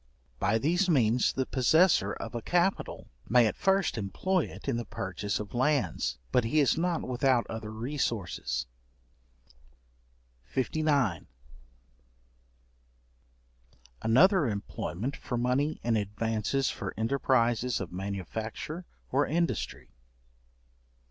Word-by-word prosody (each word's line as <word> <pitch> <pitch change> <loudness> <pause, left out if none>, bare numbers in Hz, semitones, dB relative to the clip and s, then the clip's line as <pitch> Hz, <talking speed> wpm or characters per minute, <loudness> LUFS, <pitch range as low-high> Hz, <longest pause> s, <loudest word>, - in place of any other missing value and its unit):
By 110 - +2
these 175 - +1
means 125 -6 +3
the 130 - -1
possessor 135 - +3
of 115 - -7
a 120 - -3
capital 175 - 0 0.2
may 120 +1 +6
at 110 - 0
first 190 -10 +1
employ 175 - 0
it - - -11
in 135 -4 +1
the 120 - -3
purchase 100 +2 -3
of 105 -1 -7
lands; 125 - +1
but 125 - +3
he 135 +7 +1
is 140 - +4
not 170 0 0
without 125 -1 +2
other 110 -1 -5
resources. 115 -4 -2 1.9
§59. 135 - +1 2.7
Another 160 - +5
employment 105 +3 -3
for 120 - -4
money 130 +5 0
in 115 -1 +1
advances 110 +5 0
for 100 -3 -6
enterprises 120 0 +1
of 95 -5 -5
manufacture 100 - -5 0.2
or 140 +3 +2
industry. 170 +3 -2
125 Hz, 110 wpm, -29 LUFS, 110-150 Hz, 2.7 s, may